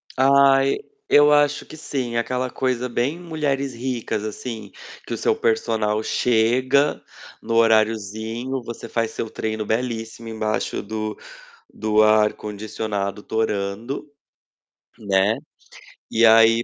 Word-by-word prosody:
Ai! 135 0 +4 0.3
Eu 145 0 +6
acho 145 0 +3
que 155 - -11
sim, 130 -6 -3
aquela 125 +2 -1
coisa 125 -1 -1
bem 125 +7 -1
mulheres 145 -6 -2
ricas 120 -3 -3
assim, 110 -1 -6 0.3
que - - -5
o - - -2
seu - - +2
personal 110 -1 0
chega 125 +6 +2 0.4
no 115 0 -2
horariozinho. 110 +3 +1
Você 115 0 -8
faz 115 -1 -1
seu 115 - -4
treino 110 0 -3
belíssimo, 115 0 -3
embaixo 110 -1 -2
do 110 +1 -4 0.6
do 110 0 +2
ar-condicionado 105 -1 0
torando, 110 +5 -2 0.9
né? 100 0 +2 0.8
E 115 +1 +4
aí 115 +1 +6
115 Hz, 110 wpm, -22 LUFS, 110-130 Hz, 0.9 s, Eu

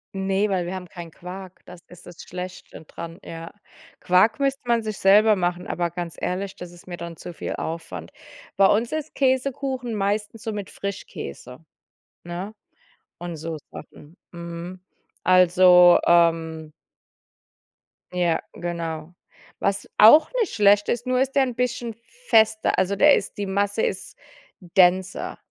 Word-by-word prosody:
Ne, 195 +2 0
weil 180 -3 0
wir 180 - -5
haben 185 -1 -6
keinen 170 -2 -9
Quark. 185 +1 -10
Das 180 -1 -13
ist 180 0 -15
das 175 - -11
Schlechte 180 -2 -9
dran. 165 +4 -9
Ja. 165 0 -9 0.5
Quark 185 +9 +3
müsste 275 0 0
man 235 -1 +2
sich 215 -2 -5
selber 210 +2 +5
machen, 180 -1 -2
aber 175 -1 -2
ganz 170 -1 -6
ehrlich, 190 +2 -3
das 180 -1 -9
ist 175 +1 -17
mir 175 -1 -6
dann 170 0 -7
zu 175 - -9
viel - - -5
Aufwand. 95 - -6 0.5
Bei 195 - +6
uns 225 +6 +2
ist 310 0 -4
Käsekuchen 260 -2 -1
meistens 210 +2 -2
so 220 - -3
mit 205 -2 -6
Frischkäse, 140 - -7 0.6
ne, 180 +5 -6 0.7
und 175 -1 -6
so 160 +1 -5 0.2
Sachen. 150 +3 -13 0.2
Mhm. 170 +1 -8 0.4
Also, 180 -1 +6
ähm 165 -2 +2 1.4
Ja, 175 -2 0
genau. 165 -1 -5 0.5
Was 200 0 -1
auch 265 - +8
nicht 440 - 0
schlecht 205 0 +4
ist, 240 +1 -1
nur 255 0 +1
ist 270 0 0
der 275 - +5
'n 250 -3 -3
bisschen 240 -2 -2 0.3
fester. 220 0 +3
Also, 200 +2 +1
der 290 +8 +6
ist 200 - -4
die 205 - -2
Masse 200 +2 -1
ist - - -3 0.5
denser, 185 +1 +1
185 Hz, 150 wpm, -23 LUFS, 175-215 Hz, 1.4 s, auch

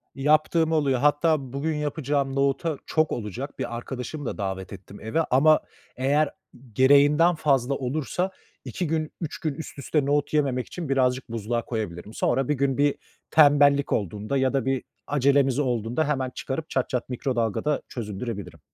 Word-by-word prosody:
Yaptığım 155 +3 +2
oluyor. 140 -5 +2
Hatta 145 -2 +2
bugün 155 +3 -1
yapacağım 145 -2 -1
nohuta 140 +3 0
Çok 155 -1 +1
olacak. 120 +5 -5
Bir 120 - -3
arkadaşımı 130 +4 -6
da - - -4
davet 95 -1 -4
ettim 100 +1 -11
eve 110 +10 0
ama 150 +4 +5 0.4
eğer 140 +3 +2 0.4
gereğinden 145 - +5
fazla 140 -4 +1
olursa 155 +8 -2 0.3
2 180 - -3
gün, 155 0 -1
3 160 - -4
gün 155 -3 -2
üst 145 0 -8
üste 145 +1 0
nohut 145 +1 0
yememek 135 -4 +1
için 170 -5 -6
birazcık 130 -1 +1
buzluğa 115 +1 -2
koyabilirim. 105 -3 -5
Sonra 130 +3 0
bir 150 - +2
gün 140 -1 0
bir 145 0 +3 0.4
tembellik 145 -2 +5
olduğunda 105 +6 -2
ya 130 0 +1
da 135 -1 0
bir 135 -1 0 0.2
acelemiz 140 -1 +3
olduğunda 125 +2 0
hemen 135 -3 0
çıkarıp 140 +5 -5
çat 130 - -1
çat 125 -1 -2
mikrodalgada 125 +2 -1
çözündürebilirim. 100 -6 -6
135 Hz, 155 wpm, -25 LUFS, 125-150 Hz, 0.4 s, ama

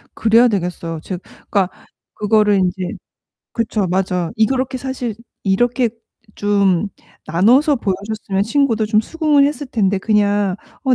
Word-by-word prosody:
그래야 230 +2 +5
되겠어요. 175 -5 -3
즉 185 -2 -5 0.3
그러니까 195 -3 +1 0.4
그거를 210 -1 +2
인제 185 0 -1 0.6
그쵸. 220 -4 -1
맞아. 180 -1 0
이 220 0 +4
그렇게 260 0 -1
사실 250 -4 -4 0.3
이렇게 240 +5 +1 0.4
좀 200 -2 +1 0.4
나눠서 250 - +4
보여줬으면 200 -1 -2
친구도 230 -3 +1
좀 215 0 +3
수긍을 300 +2 +2
했을 290 0 -2
텐데 200 -5 +1
그냥 205 -2 +1 0.3
"어 260 -2 +4
210 Hz, 290 characters per minute, -18 LUFS, 190-245 Hz, 0.6 s, 그래야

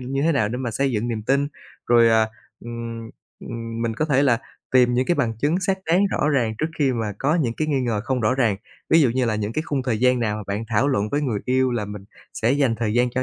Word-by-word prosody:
như 135 +2 -2
thế 165 +1 +3
nào 110 -7 +1
để 120 - -3
mà 125 -3 -3
xây 135 +5 0
dựng 115 +2 -1
niềm 110 -2 -3
tin, 140 +4 +1 0.4
rồi, 120 -1 +5
à, 110 -1 +3 0.4
ừm, 115 -1 -6 0.3
ừm, 115 0 -5
mình 115 -1 -1
có 155 - 0
thể 140 -2 +2
là 120 -5 +3 0.3
tìm 125 -1 +4
những 130 +1 +1
cái 175 - +2
bằng 120 -7 0
chứng 155 +9 +1
xác 190 +1 0
đáng 170 +3 +3
rõ 150 - 0
ràng 120 -7 +1
trước 155 - 0
khi 135 -3 +2
mà 110 -3 -2
có 150 +4 +1
những 135 -9 +1
cái 155 0 -1
nghi 140 -3 +1
ngờ 115 -4 -1
không 130 -2 -1
rõ 110 +3 +2
ràng. 115 -7 +1 0.3
Ví 165 - +6
dụ 130 -6 +4
như 130 +1 0
là 110 -2 0
những 105 +1 -2
cái 155 - -1
khung 140 -4 -2
thời 120 -4 -1
gian 125 -1 +3
nào 105 -2 0
mà 105 - -5
bạn 100 +3 -3
thảo 115 +5 +2
luận 105 -6 0
với 145 +4 0
người 120 -7 -1
yêu 130 0 +2
là 115 -4 -1
mình 105 -1 -8 0.3
sẽ 115 +4 +1
dành 135 -5 +2
thời 110 -1 -1
gian 125 0 +2
cho 130 +1 -1
120 Hz, 275 wpm, -22 LUFS, 115-140 Hz, 0.4 s, Ví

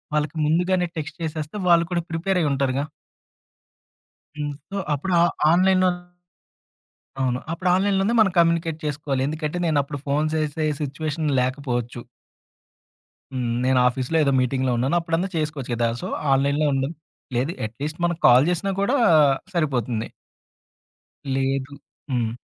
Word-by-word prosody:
వాళ్ళకి 150 +1 -1
ముందుగానే 180 +3 +2
టెక్స్ట్ 160 +3 -6
చేసేస్తే, 155 +3 -4
వాళ్ళు 170 -1 +5
కూడా 170 -1 0
ప్రిపేరయి 170 -1 0
ఉంటారుగా. 135 0 0 1.5
హ్మ్. 145 -1 -3 0.2
సో, 200 - -5 0.2
అప్పుడు 180 +6 -3
ఆహ్, 170 0 +3 0.2
ఆన్లైన్‌లోన్ 185 0 +3 1.2
అవును. 125 -1 0
అప్పుడు 180 +2 -1
ఆన్లైన్‌లోనే 195 +3 +1
మన 215 -3 +5
కమ్యూనికేట్ 165 -1 +2
చేసుకోవాలి. 145 -2 -2
ఎందుకంటే, 155 +2 -3
నేనప్పుడు 145 -2 0
ఫోన్ 150 +2 +1
జేసే 155 0 -1 0.2
సిట్యుయేషన్ 150 +2 -2
లేకపోవచ్చు. 125 -2 -2 1.3
హ్మ్. 130 -2 -2 0.2
నేనాఫీస్‌లో 125 +3 +2
ఏదో 140 - +2
మీటింగ్‌లో 130 0 0
ఉన్నానప్పుడన్నా 165 +7 0
చేసుకోవచ్చు 150 -5 -3
గదా! 115 0 +1
సో, - - -3 0.3
ఆన్లైన్‌‌లో 140 +3 +2
ఉండలి, 135 +4 -1 0.4
లేదు 130 +7 0
అట్లీస్ట్ 145 +8 -6
మనం 175 -1 +1
కాల్ 125 +4 +6
జేసినా 180 +3 -1
కూడా 245 +8 +2 0.6
సరిపోతుంది. 125 -8 -1 1.3
లేదు 135 +1 -1 0.4
హ్మ్. 115 -2 0
150 Hz, 115 wpm, -23 LUFS, 135-170 Hz, 1.5 s, కాల్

